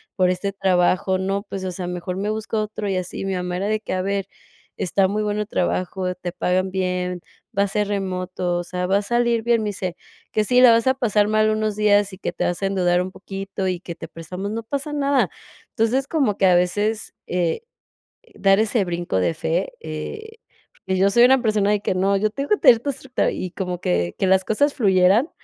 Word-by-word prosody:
por 185 -2 +3
este 185 +2 -2
trabajo? 185 0 +2
No, 195 +1 -2
pues, 190 -1 -5
o 185 - -2
sea, 180 0 -5
mejor 180 0 -4
me 205 +2 -2
busco 215 0 -2
otro 215 -1 -4
y 190 - 0
así". 185 +1 -4
Mi 195 - -1
mamá 180 0 -3
era 195 +3 -2
de 215 0 0
que: - - -7
"A 185 - 0
ver, 200 0 -1 0.5
está 190 +2 +2
muy 210 +1 -1
bueno 210 0 -1
el 210 - -4
trabajo, 185 -1 -1
te 180 -1 -5
pagan 185 +2 0
bien, 180 -1 -2 0.4
va 200 - +4
a - - 0
ser 210 +1 -1
remoto, 185 -2 -2
o - - -3
sea, 180 +1 -3
va 195 +2 +2
a 205 - 0
salir 235 +1 +1
bien". 230 -1 +2
Me 210 - -1
dice: 185 -3 -4 0.3
"Que 215 - +1
si 250 +2 +4
la 250 -2 +9
vas 230 +2 +3
a 260 - +5
pasar 215 -5 +1
mal 215 0 +3
unos 215 -1 0
días, 205 -1 +3
y 190 - -10
que - - -3
te - - -2
vas 175 - -2
a - - +3
endeudar 180 -2 +2
un 185 - -4
poquito 195 0 -5
y 180 -1 -2
que 170 -3 -7
te - - -8
prestamos, 180 +5 -6
no 225 +1 -4
pasa 280 +5 -4
nada". 280 -1 +2 0.4
Entonces, 250 +4 +1
como 270 -11 +1
que 195 - +3
a 180 -1 +6
veces, 205 +5 0
eh, 175 - -1 0.7
dar 195 +1 +4
ese 220 -1 +2
brinco 175 - -2
de 130 - +1
fe, 165 +4 -1
eh, 435 - -7 0.5
pues, 190 -1 0
yo 195 +1 +4
soy 235 +4 +5
una 260 0 +5
persona 210 -3 +2
de 210 - +2
que: 190 - -1
"No, 195 +2 +2
yo 215 +2 +1
tengo 275 +5 -4
que 420 - +4
tener 250 - +7
todo 280 +4 -2
estructurado". 265 -1 -2
Y 185 - -4
como 180 -2 -4
que 85 -1 0
que 190 - +2
las 190 0 +3
cosas 285 +7 +2
fluyeran 195 - +4
195 Hz, 230 wpm, -22 LUFS, 180-215 Hz, 0.7 s, la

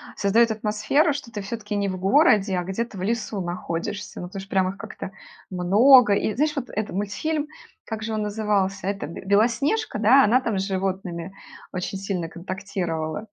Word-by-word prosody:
создаёт 225 +3 +3
атмосферу, 220 +9 +1
что 270 -5 -7
ты 205 - -5
всё-таки 210 +1 -5
не 200 -1 0
в 185 - -3
городе, 200 - +4
а 180 - -1
где-то 200 +3 -4
в - - -6
лесу 215 -1 -2
находишься. 175 +3 -4
Ну, 180 - -5
потому 195 +2 -7
что 195 - -13
прям 190 -1 +2
их 195 - -7
как-то 190 - -7 0.4
много. 205 +6 +6
И 205 +1 0
знаешь, 300 +3 +1
вот 265 -3 -4
этот 215 +1 -3
мультфильм, 290 +10 -2 0.4
как 220 -1 -5
же 225 0 -3
он 215 - -1
назывался? 205 -2 -1
Это 195 -7 -2
б 165 - -8
Белоснежка, 235 - +1
да, 250 +6 +6
она 245 +5 +4
там 215 -6 -1
с - - 0
животными 190 -2 -3 0.4
очень 185 +1 -4
сильно 190 -4 -3
контактировала? 180 -2 -4
205 Hz, 180 wpm, -24 LUFS, 190-225 Hz, 0.4 s, много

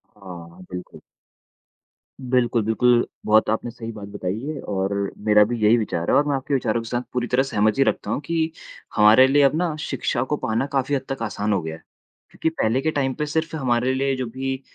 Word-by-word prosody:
हाँ, 90 -3 -11
बिल्कुल। 90 0 -8 1.2
बिल्कुल, 125 -2 +1
बिल्कुल, 120 +2 +3 0.2
बहुत 110 0 +4
आपने 115 +2 -1
सही 115 -1 -7
बात 100 -2 -8
बताई 100 0 -4
है 155 -1 -4
और 95 0 -2 0.3
मेरा 105 -1 +6
भी 120 +2 -3
यही 110 +3 +5
विचार 85 -6 -2
है - - +4
और 145 - +3
मैं 140 - +1
आपके 135 +1 -3
विचारों 115 -3 0
के 115 - -9
साथ 120 0 -1
पूरी 125 -1 -1
तरह 130 +2 +2
सहमति 110 +1 +2
रखता - - -1
हूँ - - 0
कि 165 0 0 0.4
हमारे 110 +5 +7
लिए 145 +2 +4
अब 140 +2 +4
ना 165 -2 0
शिक्षा 130 -4 -2
को 150 - +2
पाना 115 +4 -1
काफ़ी 135 +1 +1
हद 130 - -1
तक 135 -3 -4
आसान 105 -1 -1
हो 95 - 0
गया 80 0 -5
है। - - -15 0.5
क्योंकि 160 - -1
पहले 130 -4 0
के 155 - 0
टाइम 135 -3 0
पे 150 - -2
सिर्फ 160 +2 -2
हमारे 125 -2 +1
लिए 135 0 0
जो 130 - -3
भी 130 +2 -4
120 Hz, 210 wpm, -23 LUFS, 105-135 Hz, 1.2 s, हमारे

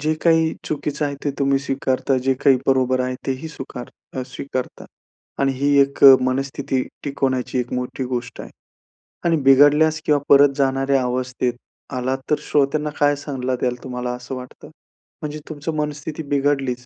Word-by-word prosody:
जे 155 +2 +1
काही 160 -1 +3
चुकीचं 150 0 -2
आहे 140 - -4
ते 145 - +1
तुम्ही 140 -1 +2
स्वीकारता, 135 -1 -1
जे 135 +1 +1
काही 135 -2 +6
बरोबर 130 -1 +2
आहे 130 0 -1
ते 135 - +1
ही 160 - -5
स्वीकार 130 -2 -8
स्वीकारता 130 0 -5 0.6
आणि 135 0 +2
ही 140 +1 +1
एक 140 0 0 0.3
मनस्थिती 135 0 -2 0.2
टिकवण्याची 130 -3 -1
एक 125 0 -3
मोठी 125 +1 -3
गोष्ट 125 -1 -4
आहे. - - -9 0.8
आणि 165 -1 +3
बिघडल्यास 150 +3 +5
किंवा 150 -1 +3
परत 140 0 +7
जाणाऱ्या 135 0 +2
अवस्थेत 125 0 -1 0.4
आलात, 130 +1 -1
तर 150 - +4
श्रोत्यांना 150 +1 +1
काय 145 0 +4
सल्ला 130 -3 -2
द्याल 125 -1 0
तुम्हाला 125 -1 -4
असं 125 +1 -7
वाटतं? 125 0 -10 0.5
म्हणजे 150 0 -5
तुमची 155 +1 -4
मनस्थिती 150 +1 -5
बिघडलीच. 135 -3 0
135 Hz, 155 wpm, -21 LUFS, 130-145 Hz, 0.8 s, परत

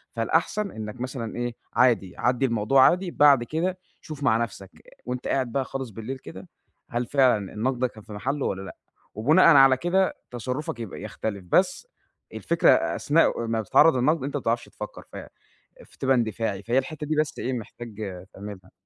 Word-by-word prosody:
فالأحسن 170 - 0
إنَّك 110 +3 -7
مثلًا 125 -3 -5
إيه، 120 -1 -3 0.2
عادي 115 -8 +2
عدّي 125 +2 +1
الموضوع 115 +3 +4
عادي، 180 0 -1
بعد 140 -6 +5
كده 180 +6 -2 0.2
شوف 150 -2 -8
مع 110 -4 +4
نفسك، 100 -4 -5 0.3
وأنت 125 0 -4
قاعد 130 -3 0
بقى 135 0 -1
خالص 135 -2 -5
بالليل 115 +6 -6
كده، 95 -5 -11 0.4
هل 120 +1 -2
فعلًا 125 -8 +2
النقد 120 +4 -1
ده 130 - +2
كان 110 -3 -14
في 110 - -11
محلّه 135 +7 -2
والّا 95 - -2
لأ، 95 - -9 0.4
وبناءً 150 - +4
على 135 -1 +7
كده 185 +5 +1
تصرفك 125 +2 -4
يبقى 110 -4 -7
يختلف 100 -2 -5
بس 275 - +2 0.5
الفكرة - - +2
أثناء 145 -6 +2
ما 115 0 0
بتتعرض 130 +7 +5
للنقد، 140 +3 +1
أنت 145 +1 -4
ما - - -5
بتعرفش 115 +1 -1
تفكَّر، - - -9
ف - - -7 0.7
فتبقى 135 0 0
اندفاعي، 110 -4 -2
فهي 120 +2 0
الحتّة 150 +2 -2
دي 155 - 0
بس 155 -1 -1
إيه 130 - -2
محتاج 115 -2 -8 0.4
تعملها. 95 -2 -10
125 Hz, 170 wpm, -25 LUFS, 110-140 Hz, 0.7 s, على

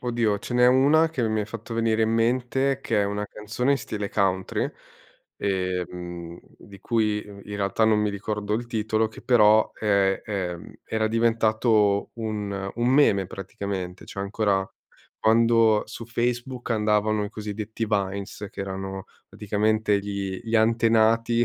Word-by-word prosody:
oddio, 115 -4 0
ce 120 - -6
n'è 125 0 +5
una 145 +6 +4
che 125 -8 -1
mi 110 0 0
hai 105 - -2
fatto 115 +1 -7
venire 115 -1 +1
in 110 - +2
mente 125 +4 +1
che 110 -5 +1
è - - +1
una 105 +1 -3
canzone 110 +7 -1
in - - +3
stile 105 -5 -4
country, 95 -1 0 0.7
ehm, 90 -3 -3 0.2
di 100 -2 -15
cui 110 -2 +1
i - - -8 0.2
in 105 - -4
realtà 100 +2 +1
non 110 -1 +4
mi 105 0 +1
ricordo 105 +1 -3
il 120 +2 -3
titolo, 110 -1 0
che 110 - -13
però 110 -3 +4
è, 100 -2 +1
ehm, 90 -5 -4
era 110 0 -1
diventato 110 -2 +2
un 105 -3 -4
un 120 +1 0
meme 125 -8 +4
praticamente, 95 -1 -6
cioè 100 - -5
ancora 100 -1 0 0.5
quando 115 -1 +4
su 115 - -9
Facebook 120 +1 -2
andavano 105 -1 +1
i - - -4
cosiddetti 110 +1 -5
vines, 100 -1 -2
che - - -8
erano 95 0 -5 0.2
praticamente 105 0 0
gli 100 -1 -4
gli 115 0 -4
antenati, 115 +1 +3
110 Hz, 150 wpm, -25 LUFS, 100-115 Hz, 0.7 s, n'è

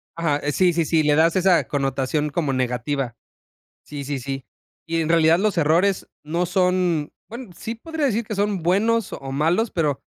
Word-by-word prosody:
Ajá, 160 -4 0
eh, 145 - 0
sí, 180 +2 +3
sí, 165 -1 +1
sí, 160 -1 +2
le 150 0 +3
das 165 +2 +3
esa 185 -2 +3
connotación 140 +2 -1
como 145 -3 -1
negativa. 125 0 -2 0.7
Sí, 145 -2 -7
sí, 140 0 -3
sí. 135 0 -5 0.4
Y 165 0 -1
en 160 - -1
realidad 165 0 +4
los 205 -3 0
errores 170 +5 +2
no 170 +4 -1
son 180 -4 +1 0.2
bueno, 235 -3 -9
sí 225 +1 -5
podría 315 +4 -3
decir 230 -1 0
que 215 -1 -5
son 200 -3 0
buenos 210 +5 +1
o 135 -1 -6
malos, 170 - +1
pero 150 -5 0
165 Hz, 185 wpm, -22 LUFS, 145-190 Hz, 0.7 s, realidad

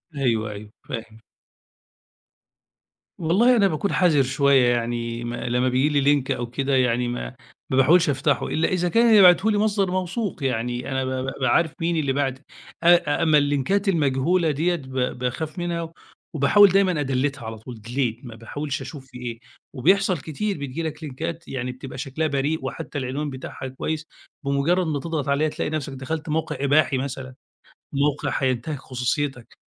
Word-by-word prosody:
أيوه، 115 -6 0
أيوه، 105 +1 -9 0.2
فاهم. 110 -1 -7 2.0
والله 205 +10 +4
أنا 205 -4 +4
باكون 190 +3 -1
حذر 160 -7 +4
شويّة، 135 -1 +3
يعني 120 0 -2
م 120 - -4
لمّا 125 +1 0
بييجي 130 +4 +2
لي 145 -1 +2
لينك 140 -1 +2
أو 120 -1 -2
كده 135 +2 0
يعني 125 -1 +2
ما 90 - -5 0.3
ما 130 - 0
باحاولش 165 +5 +5
أفتحه، 140 +1 +1
إلا 160 - +1
إذا 180 -2 0
كان 230 +4 +4
اللي 215 -2 +7
باعته 185 +4 +6
لي 210 - +1
مصدر 205 -3 +1
موثوق 185 - -2
يعني 125 0 -2
أنا 130 0 -1
ب 130 - -2
بابقى 130 0 -2
عارف 160 +4 +2
مين 170 +1 +1
اللي 140 -3 0
باعته، 135 -1 -1 0.4
أ 170 -3 +4
أما 155 -2 +5
اللينكات 145 +8 +1
المجهولة 160 +1 +2
ديَّة 165 +5 +1
ب 135 -5 -9 0.3
باخاف 150 +8 -3
منها 170 -1 -3 0.4
وباحاول 180 +8 +6
دايمًا 185 -4 +2
أدليتّها 135 -2 -1
على 110 0 -6
طول 110 +1 -10
delete 120 -1 -2
ما 115 -2 -9
باحاولش 145 +5 -5
أشوف 135 +1 -8
في 125 - -12
إيه. 120 -2 -6 0.3
وبيحصل 185 +7 +3
كتير 180 +8 -3
بتيجي 140 +3 -4
لك 160 0 -5
لينكات 165 +4 -5
يعني 125 -1 -3
بتبقى 130 +1 -9
شكلها 140 +4 -2
بريء 145 +2 0
وحتّى 160 -2 -5
العنوان 140 +3 -3
بتاعها 130 0 -7
كويّس، 155 +4 -4 0.4
بمجرد 150 +6 +1
ما 145 -2 -1
تضغط 155 -3 -3
عليها 150 +2 +2
تلاقي - - -3
نفسك 150 -3 -3
دخلت 150 +4 -5
موقع 155 0 -1
إباحي 140 -1 +3
مثلًا، 130 -1 -5 0.6
موقع 145 +1 0
هينتهك 130 +3 -1
خصوصيتك، 125 0 -3
140 Hz, 165 wpm, -23 LUFS, 130-165 Hz, 2.0 s, اللي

